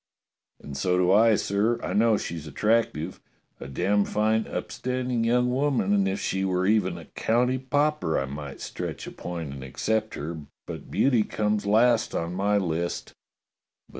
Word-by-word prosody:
"And 70 Hz, -, -9 dB
so 90 Hz, +7 st, +1 dB
do 90 Hz, 0 st, +3 dB
I, 110 Hz, +2 st, +6 dB
sir. 105 Hz, +4 st, +1 dB
I -, -, -2 dB
know 110 Hz, 0 st, +4 dB
she's 80 Hz, -5 st, -5 dB
attractive. 105 Hz, -2 st, 0 dB, 0.4 s
A -, -, -7 dB
damned 100 Hz, +9 st, +1 dB
fine, 110 Hz, +1 st, +1 dB
upstanding 125 Hz, -2 st, -2 dB
young 125 Hz, +2 st, +2 dB
woman, 130 Hz, -6 st, +1 dB
and 100 Hz, -1 st, +3 dB
if 95 Hz, +1 st, -1 dB
she 95 Hz, 0 st, -1 dB
were 95 Hz, -1 st, +1 dB
even 105 Hz, -2 st, +2 dB
a -, -, -10 dB
county 125 Hz, +3 st, +1 dB
pauper 145 Hz, -, +1 dB
I 70 Hz, -, -1 dB
might 70 Hz, 0 st, -7 dB
stretch -, -, -5 dB
a -, -, -7 dB
point 85 Hz, -5 st, -6 dB
and 65 Hz, -1 st, -8 dB
ac 65 Hz, -, -10 dB
cept 110 Hz, 0 st, 0 dB
her, 80 Hz, +2 st, -5 dB, 0.3 s
but -, -, -8 dB
beauty 125 Hz, -5 st, +3 dB
comes 105 Hz, -1 st, -1 dB
last 115 Hz, +2 st, +3 dB
on 85 Hz, +1 st, -2 dB
my 100 Hz, +2 st, +1 dB
list." 85 Hz, -2 st, -2 dB
105 Hz, 165 wpm, -26 LUFS, 90-115 Hz, 0.4 s, I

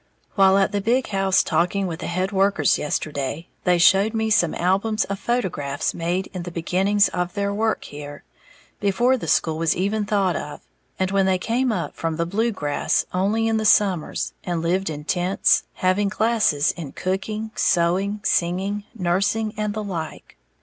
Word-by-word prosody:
_ -, -, -40 dB, 0.3 s
While 195 Hz, -1 st, +5 dB
at 195 Hz, -, +2 dB
the 205 Hz, -, -1 dB
big 245 Hz, +5 st, +1 dB
house 195 Hz, -2 st, +2 dB
talking 180 Hz, +4 st, 0 dB
with 170 Hz, -2 st, -4 dB
the -, -, -5 dB
head 185 Hz, +3 st, -1 dB
workers 195 Hz, -6 st, +2 dB
yesterday, 150 Hz, +2 st, -3 dB, 0.2 s
they 180 Hz, -1 st, +4 dB
showed 195 Hz, +5 st, +4 dB
me 220 Hz, 0 st, 0 dB
some 175 Hz, -6 st, +3 dB
albums 195 Hz, +5 st, +1 dB
of 200 Hz, 0 st, -5 dB
photographs 165 Hz, -, -2 dB
made 175 Hz, +3 st, -2 dB
in 180 Hz, -, -4 dB
the 175 Hz, -, -6 dB
beginnings 190 Hz, +4 st, +2 dB
of 180 Hz, 0 st, -3 dB
their 200 Hz, 0 st, -1 dB
work 220 Hz, +2 st, 0 dB
here, 145 Hz, 0 st, -9 dB, 0.6 s
before 220 Hz, +6 st, +2 dB
the 250 Hz, -, -6 dB
school 160 Hz, -1 st, +1 dB
was 165 Hz, -1 st, +1 dB
even 205 Hz, +3 st, -1 dB
thought 200 Hz, -4 st, +1 dB
of, 150 Hz, -, -6 dB, 0.4 s
and 185 Hz, 0 st, -1 dB
when 195 Hz, -1 st, +2 dB
they 190 Hz, -1 st, +2 dB
came 240 Hz, +6 st, 0 dB
up 215 Hz, -, -3 dB
from 165 Hz, -1 st, -2 dB
the 170 Hz, +1 st, -1 dB
Blue 220 Hz, +7 st, 0 dB
Grass 145 Hz, -8 st, -1 dB
only 205 Hz, +5 st, +1 dB
in 225 Hz, 0 st, +1 dB
the 220 Hz, -, -1 dB
summers, 195 Hz, -6 st, +2 dB
and 170 Hz, -2 st, -2 dB
lived 185 Hz, +2 st, 0 dB
in 150 Hz, -1 st, -6 dB
tents, 180 Hz, +4 st, +2 dB
having 185 Hz, +2 st, +1 dB
classes 210 Hz, -9 st, +2 dB
in 160 Hz, -5 st, -8 dB
cooking, 210 Hz, +4 st, -3 dB
sewing, 190 Hz, +4 st, +1 dB
singing, 195 Hz, +4 st, 0 dB
nursing 205 Hz, +3 st, 0 dB
and 210 Hz, -1 st, -2 dB
the 215 Hz, -, -3 dB
like. 170 Hz, -6 st, -6 dB
190 Hz, 175 wpm, -22 LUFS, 170-210 Hz, 0.6 s, While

